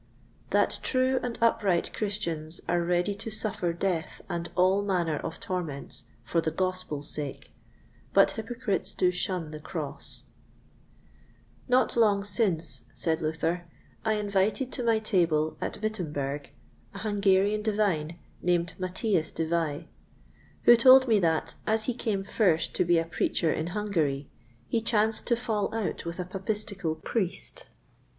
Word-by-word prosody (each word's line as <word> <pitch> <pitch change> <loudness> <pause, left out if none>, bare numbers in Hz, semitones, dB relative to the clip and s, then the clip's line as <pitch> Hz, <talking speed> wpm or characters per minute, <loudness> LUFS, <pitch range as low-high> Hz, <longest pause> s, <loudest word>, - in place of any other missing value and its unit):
That - - +2
true 260 0 +2
and 240 -2 -3
upright 200 -6 +2
Christians 170 -6 -2
are 175 0 +2
ready 175 +3 +1
to 205 +3 -6
suffer 205 -5 -1
Death 170 -1 -2
and 170 0 -3
all 185 +2 +4
manner 175 -6 0
of 165 +1 -5
Torments 150 -7 -3 0.2
for 165 +9 +1
the 160 - 0
Gospel's 185 -4 -2
sake, 145 -3 -4 0.6
but - - +5
Hypocrites 225 -2 -1
do 180 - +3
shun 180 -3 -2
the 155 - -7
Cross. 150 -3 -6 1.4
Not 255 0 +3
long 210 -4 +4
since, 180 - +1
said 160 -1 0
Luther, 165 +2 -1 0.4
I 220 - +2
invited 210 +5 0
to 250 - -3
my 230 -1 +3
table, 170 -8 +1
at - - -3
Wittemberg, 150 -9 -3 0.5
an - - -5
Hungarian 205 0 +2
Divine, 200 -7 0 0.2
named 175 -1 +1
Matthias 185 -1 0
de 165 - -2
Vai, 165 -1 -1 0.8
who 240 - +9
told 260 +2 +8
me 220 -3 +4
that, 165 -3 +1
as 220 0 +3
he 250 - 0
came 215 -5 -2
first 190 -5 +2
to - - +2
be 175 -1 +3
a 165 - +1
Preacher 165 -1 0
in 155 - -2
Hungary, 170 -9 -1 0.4
he 225 - 0
chanced 220 -1 +1
to 240 - +4
fall 220 -4 -1
out 220 -6 -2
with 170 0 -4
a 180 - -3
Papistical 195 -2 -2
Priest. 190 - -3
185 Hz, 145 wpm, -28 LUFS, 165-215 Hz, 1.4 s, who